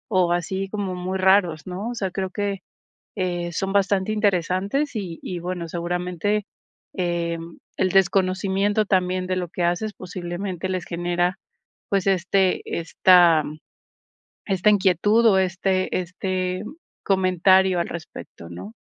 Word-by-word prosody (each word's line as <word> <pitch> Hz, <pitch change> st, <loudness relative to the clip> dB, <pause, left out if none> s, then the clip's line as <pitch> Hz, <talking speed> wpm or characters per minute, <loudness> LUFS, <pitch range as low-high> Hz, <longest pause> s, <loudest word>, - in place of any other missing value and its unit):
o, 180 Hz, -2 st, +3 dB
así 190 Hz, +3 st, -2 dB
como 200 Hz, -2 st, -3 dB
muy 185 Hz, +1 st, -3 dB
raros, 185 Hz, -5 st, +3 dB
¿no? 190 Hz, +5 st, -4 dB
O 245 Hz, -, -5 dB
sea, 195 Hz, -5 st, -2 dB
creo 190 Hz, +1 st, -3 dB
que, 200 Hz, 0 st, -3 dB, 0.6 s
eh, 175 Hz, -2 st, -2 dB
son 195 Hz, +3 st, -2 dB
bastante 200 Hz, 0 st, +1 dB
interesantes, 200 Hz, -, 0 dB
y 180 Hz, -6 st, -5 dB
y 180 Hz, -, -4 dB
bueno, 175 Hz, -1 st, -4 dB
seguramente, 180 Hz, +4 st, -2 dB, 0.5 s
eh, 170 Hz, -2 st, -1 dB, 0.4 s
el 185 Hz, -, +1 dB
desconocimiento 195 Hz, +2 st, +2 dB
también 185 Hz, -1 st, +1 dB
de 185 Hz, -, 0 dB
lo 180 Hz, -1 st, -2 dB
que 175 Hz, -, -4 dB
haces 175 Hz, +5 st, 0 dB
posiblemente 180 Hz, 0 st, -5 dB
les 185 Hz, -2 st, -2 dB
genera, 175 Hz, +1 st, -1 dB, 0.5 s
pues, 195 Hz, -1 st, +1 dB
este 190 Hz, 0 st, +2 dB, 0.2 s
esta, 170 Hz, -1 st, +5 dB, 1.0 s
esta 195 Hz, 0 st, +2 dB
inquietud, 205 Hz, +3 st, +3 dB
o, 195 Hz, -3 st, +5 dB
este 185 Hz, 0 st, 0 dB
este, 185 Hz, +1 st, -3 dB, 0.4 s
comentario 190 Hz, -1 st, +3 dB
al 170 Hz, -, -1 dB
respecto, 160 Hz, -, -9 dB
¿no? 90 Hz, +5 st, -9 dB
185 Hz, 130 wpm, -23 LUFS, 175-195 Hz, 1.0 s, esta